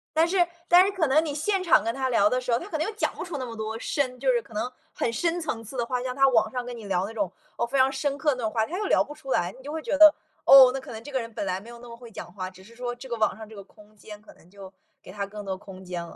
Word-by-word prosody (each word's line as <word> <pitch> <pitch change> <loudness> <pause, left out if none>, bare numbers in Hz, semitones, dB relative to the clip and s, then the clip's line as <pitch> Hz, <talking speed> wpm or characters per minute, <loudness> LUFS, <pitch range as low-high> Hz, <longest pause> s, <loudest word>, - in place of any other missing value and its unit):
但 325 +1 +4
是 350 -1 +2 0.2
但 355 +1 +7
是 395 - 0
可 375 -5 0
能 305 +4 +3
你 295 - -3
现 370 +6 0
场 335 - +5
跟 230 +1 -1
他 265 -1 -1
聊 210 -4 +4
的 250 - +1
时 250 -1 -4
候， 235 - +3
他 345 - -8
可 320 - -2
能 310 - -1
又 440 - -4
讲 - - 0
不 - - -5
出 355 -5 -5
那 255 - -3
么 230 - -8
多 220 0 -4
深 255 -1 -2
就 265 0 +2
是 240 - +2
可 230 - -15
能 215 +4 -2 0.2
很 - - -1
深 340 +7 -1
层 270 -8 -4
次 230 +5 -11
的 245 - 0
话， 250 +1 -2
像 255 -1 -3
他 270 0 +5
网 220 -3 +2
上 250 -1 -3
跟 245 0 -7
你 225 - -10
聊 185 -3 0
的 - - -3
那 220 - -9
种， 200 -5 -1 0.3
哦， 235 - +1
非 265 +3 -1
常 260 +1 +4
深 275 +1 -1
刻 295 -2 +2
的 240 -3 -2
话， 220 0 0
他 355 - -4
又 420 - -2
聊 - - +3
不 295 - -10
出 275 -3 -8
来， 175 -5 +1
你 260 - -15
就 290 - -6
会 320 +1 -4
觉 290 - -1
得， 310 0 +9 0.3
哦， 270 -2 +10
那 270 - -3
可 265 - -11
能 220 -1 -8
这 290 - -9
个 265 - 0
人 230 -1 -7
本 - - -3
来 185 0 -1
没 205 - -15
有 235 - -11
那 245 - -12
么 235 - -10
会 235 -1 -13
讲 - - -9
话， 185 -2 -5
只 185 0 -16
是 230 +4 -17
说 245 0 -4
这 245 +2 -11
个 235 - -2
网 220 -2 +1
上 220 -1 -10
这 220 - -12
个 200 - -9
空 210 +1 -21
间 210 0 -11
可 215 - -16
能 - - -22
就 195 -1 -11 0.3
给 - - -12
他 200 +1 -4
更 205 +1 -9
多 190 -1 -4
空 190 -1 -12
间 180 -2 -5
了， 170 - -12
245 Hz, 375 characters per minute, -26 LUFS, 215-285 Hz, 0.3 s, 哦